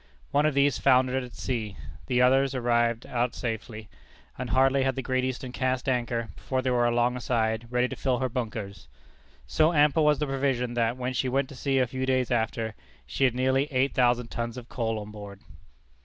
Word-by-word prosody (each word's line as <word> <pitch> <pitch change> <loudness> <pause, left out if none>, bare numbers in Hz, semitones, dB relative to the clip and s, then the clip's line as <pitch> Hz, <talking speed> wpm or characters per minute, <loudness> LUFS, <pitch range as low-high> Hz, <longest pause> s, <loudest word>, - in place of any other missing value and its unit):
One 145 +2 +3
of 150 - -1
these 140 -2 +3
foundered 130 +1 +3
at 125 - -11
sea; 110 -7 -3 0.3
the 125 -1 +3
others 135 +1 +3
arrived 120 -2 +1
out 120 -1 -1
safely, 110 -2 -5 0.5
and 125 -1 -5
hardly 135 +3 +3
had 135 -1 +1
the 130 - -3
Great 130 +1 0
Eastern 130 0 -3
cast 130 0 -1
anchor 120 -3 -1
before 130 -1 -3
they 130 - 0
were 120 -1 +3
alongside, 120 -2 0
ready 125 +1 +1
to - - -6
fill 130 -2 0
her 130 +2 0
bunkers. 110 -6 -5 0.6
So 160 +2 +2
ample 150 +1 +4
was 150 -1 +4
the 150 - -1
provision, 135 -3 -1
that, 120 0 0
when 130 0 -3
she 130 +1 0
went 135 +1 0
to 140 - -10
sea 135 +1 0
a 130 - +4
few 130 +2 -4
days 130 -2 +1
after, 110 -1 -1 0.3
she 135 - 0
had 125 -2 +1
nearly 130 +3 +1
eight 130 +1 +1
thousand 120 -1 +2
tons 115 +1 -4
of 125 -1 -9
coal 115 -3 -2
on 105 0 -7
board. 100 -2 -10
125 Hz, 200 wpm, -27 LUFS, 120-130 Hz, 0.6 s, ample